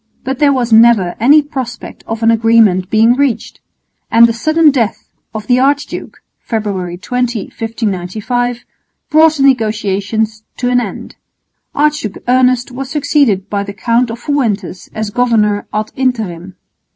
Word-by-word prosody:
But 265 +1 -4
there 290 -1 +4
was 245 -4 0
never 220 -6 +5
any 290 +7 +5
prospect 260 -5 -7
of 225 0 -4
an 225 - +5
agreement 225 -5 +3
being 225 +2 +4
reached; 260 -4 -2 0.5
and 230 +1 +6
the 230 - +1
sudden 310 +6 +3
death 235 -6 -2 0.2
of 215 -2 -6
the 245 +2 +2
archduke 285 +2 -2 0.2
(February 195 -6 -4
20,1595) 230 0 -3 0.5
brought 315 0 +5
the 275 - 0
negotiations 215 -3 0 0.2
to 245 - -1
an 245 0 +3
end. 220 - -8 0.6
Archduke 295 -8 0
Ernest 255 0 +2
was 260 +1 -6
succeeded 275 -9 +1
by 205 -1 -2
the 200 0 -7
Count 235 +3 0
of 230 - -5
Fuentes 225 - -3
as 215 -1 -4
governor 215 -4 +1
_ad 215 0 -3
interim. 200 -9 -3
230 Hz, 140 wpm, -14 LUFS, 210-255 Hz, 0.6 s, and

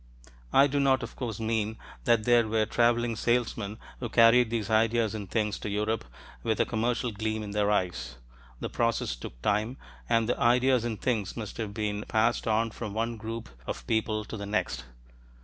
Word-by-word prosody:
I 140 - +7
do 145 0 0
not, 135 -2 +3
of 120 - -7
course, 115 -5 -4
mean 110 -1 -1 0.3
that 115 -2 +4
there 120 -1 +4
were 110 0 +2
traveling 120 +1 +2
salesmen 115 -2 0 0.2
who 120 - -4
carried 115 +1 +6
these 110 -3 -1
ideas 110 0 +3
and 105 -4 -6
things 105 -2 0
to - - -4
Europe 105 +2 -1 0.4
with 110 -2 0
a - - +4
commercial 120 +2 0
gleam 110 +1 -2
in 105 - -6
their 105 0 +1
eyes. 75 -12 -1 0.4
The - - -3
process 115 - 0
took - - -9
time, 105 +5 +1 0.3
and 115 -1 +3
the 125 - 0
ideas 125 0 +4
and 115 -3 -3
things 110 -6 -1
must 110 -4 -6
have 105 -3 -4
been 105 -1 -2
passed 115 +2 +1
on 110 +1 +2
from 105 -2 -6
one 115 +1 -1
group 115 +1 -5 0.2
of - - -5
people 110 - 0
to 110 - -7
the 100 0 -5
next. 105 -10 -1
110 Hz, 185 wpm, -28 LUFS, 105-120 Hz, 0.4 s, I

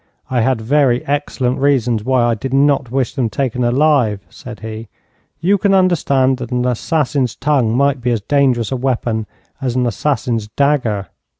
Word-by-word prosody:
'I 125 -2 +1
had 125 -1 +1
very 125 0 +2
excellent 140 -3 -1
reasons 125 -6 +1
why 130 0 +2
I 120 0 +2
did 130 +4 -3
not 140 -2 +2
wish 130 -1 -1
them 125 -5 -1
taken 125 +1 -2
alive,' 120 - +2
said - - -10
he. 110 0 -7 0.5
'You 195 +4 +2
can 200 0 +2
understand 140 -8 +2
that 120 -1 -6
an 125 0 -1
assassin's 130 0 0
tongue 130 -6 +1
might 140 -1 +1
be 125 - -1
as 115 -3 0
dangerous 130 -2 +1
a - - 0
weapon 120 -4 -1 0.3
as 125 -2 -2
an 125 -1 +1
assassin's 120 -2 -1
dagger. 115 -6 0
125 Hz, 170 wpm, -17 LUFS, 115-140 Hz, 0.5 s, very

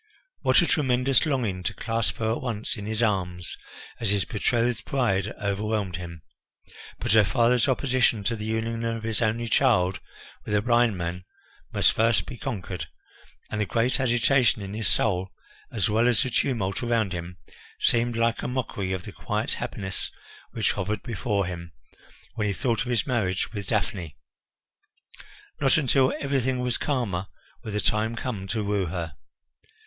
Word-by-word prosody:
What - - +4
a - - +2
tremendous 135 -1 +3
longing 115 -10 0
to - - -2
clasp 115 -3 -1
her 110 -1 0
at 115 - -2
once 115 -4 -2
in 105 -2 -6
his 110 +1 0
arms 90 -5 -1 0.4
as 115 - 0
his 100 -1 +2
betrothed 120 +2 0
bride 105 -8 +1
overwhelmed 100 -2 -1
him; 85 -3 -8 0.7
but - - -2
her 110 0 +7
father's 120 +4 +3
opposition 130 -5 +2
to 110 +4 0
the 105 -1 -5
union 115 +1 -2
of 115 -1 -2
his 110 0 0
only 115 +1 +1
child 90 -3 +3 0.4
with 105 - -1
a 105 - +3
blind 120 -3 +3
man 85 +1 -3 0.5
must - - +4
first 110 -4 +3
be - - -7
conquered, 120 - -4 0.6
and 105 - -1
the 105 - 0
great 120 +4 +1
agitation 120 -2 +3
in 100 +1 -6
his 110 0 -2
soul, 95 -3 +2 0.4
as 110 -5 +1
well 110 +3 +3
as 120 -4 +3
the 130 - -3
tumult 110 -7 0
around 115 -5 +1
him, 90 +1 -6 0.4
seemed 120 0 +2
like 115 0 +1
a - - -2
mockery 110 -7 -2
of 95 -1 -3
the - - -8
quiet - - -2
happiness 95 -2 -4 0.4
which - - 0
hovered 105 +2 -2
before 105 -4 -1
him 85 -2 -6 0.6
when 110 -3 -1
he 100 - 0
thought 120 0 0
of - - -2
his 120 -2 +1
marriage 110 -7 0
with 100 -2 -4
Daphne. 100 - -2 1.4
Not 135 0 +4
until 135 -3 +3
everything 130 -2 0
was 125 -1 -1
calmer 105 -10 -1 0.4
would 110 - -5
the - - +1
time 110 +2 +1
come 110 -5 -4
to 110 +1 -1
woo 100 -2 0
her. 85 -2 -4
110 Hz, 165 wpm, -26 LUFS, 100-120 Hz, 1.4 s, her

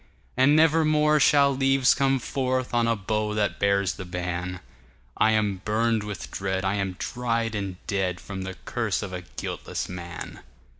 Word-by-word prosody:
And 130 +4 +5
never 160 +1 +5
more 150 0 +3
shall 140 -1 +5
leaves 135 -1 +4
come 135 -1 +2
forthOn 125 -2 0
a - - +2
bough 105 +1 -2
that 105 -2 0
bears 100 -1 +2
the 95 - -7
ban;I 90 - -4
am 105 -3 0
burned 110 +1 +1
with 105 -1 -6
dread, 95 -1 -2
I 95 - +1
am 95 -2 -2
dried 115 -2 -2
and 100 -3 -3
dead, 95 -3 -1
From 95 -1 -7
the 95 0 -5
curse 115 -5 -1
of 95 -2 -6
a 90 - -4 0.2
guiltless - - -4
man. 85 -1 -7
105 Hz, 160 wpm, -26 LUFS, 95-130 Hz, 0.2 s, And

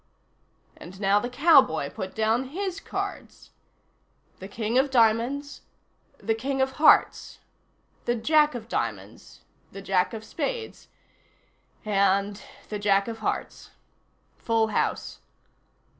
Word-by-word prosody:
And 185 +3 -12
now 200 0 +3
the 245 - -4
cowboy 255 - +4
put 190 - -7
down 220 +4 +1
his 375 +6 -4
cards. - - -7 0.9
The 190 - -8
King 220 +4 -1
of 275 +2 +1
diamonds. 245 +4 +1 0.6
The 225 - -1
King 265 +5 -3
of 265 0 +1
hearts. 300 +4 +3 0.7
The 240 - +1
Jack 300 +5 +3
of 225 -2 -7
diamonds. - - -5 0.3
The 195 - -9
Jack 190 +3 0
of 220 - -8
spades. 470 - -5 1.0
And 200 0 +1 0.3
the 210 - -4
Jack 200 0 +2
of 225 -1 -6
hearts. 220 - -4 0.7
Full 225 -1 +1
house. - - -2
225 Hz, 115 wpm, -25 LUFS, 205-270 Hz, 1.0 s, cowboy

